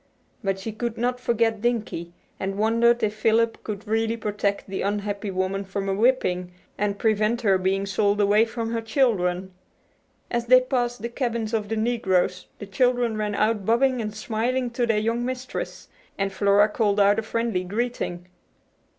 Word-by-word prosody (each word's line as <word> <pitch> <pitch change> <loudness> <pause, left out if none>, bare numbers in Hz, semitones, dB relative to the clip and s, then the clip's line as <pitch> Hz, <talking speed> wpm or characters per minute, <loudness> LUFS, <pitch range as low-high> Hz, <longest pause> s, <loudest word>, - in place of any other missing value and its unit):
But 195 -1 0
she 195 +4 -5
could 230 +1 -4
not 245 +1 -1
forget 230 -3 +1
Dinkie, 215 -8 -2 0.3
and 195 +1 -3
wondered 230 +2 +3
if 210 - +1
Philip 225 +1 +1
could 210 0 -6
really 225 +1 0
protect 205 -2 -2
the 195 0 -4
unhappy 205 0 -2
woman 190 +1 -1
from 195 0 -4
a 195 - +1
whipping, 195 -5 +1 0.2
and 205 0 -1
prevent 215 +2 +1
her 195 -4 +3
being 190 +1 0
sold 205 +1 +1
away 210 +2 +4
from 230 0 -4
her 230 -1 -1
children. 190 -7 0 0.8
As 235 0 -1
they 255 +1 +8
passed 245 -2 -1
the 235 - -2
cabins 235 -3 -2
of 210 -2 -1
the 225 - -1
negroes 195 -6 0
the - - -7
children 245 +3 +1
ran 210 -1 -2
out 215 -1 +1
bobbing 245 +4 +2
and 215 -1 -5
smiling 240 +3 -1
to 240 0 0
their 225 -2 +2
young 230 +3 0
mistress, 255 0 -5 0.3
and 195 0 -1
Flora 200 +1 +4
called 210 -2 +1
out 205 +1 +4
a - - 0
friendly 225 -3 -1
greeting. 200 -3 -3
215 Hz, 170 wpm, -24 LUFS, 200-235 Hz, 0.8 s, they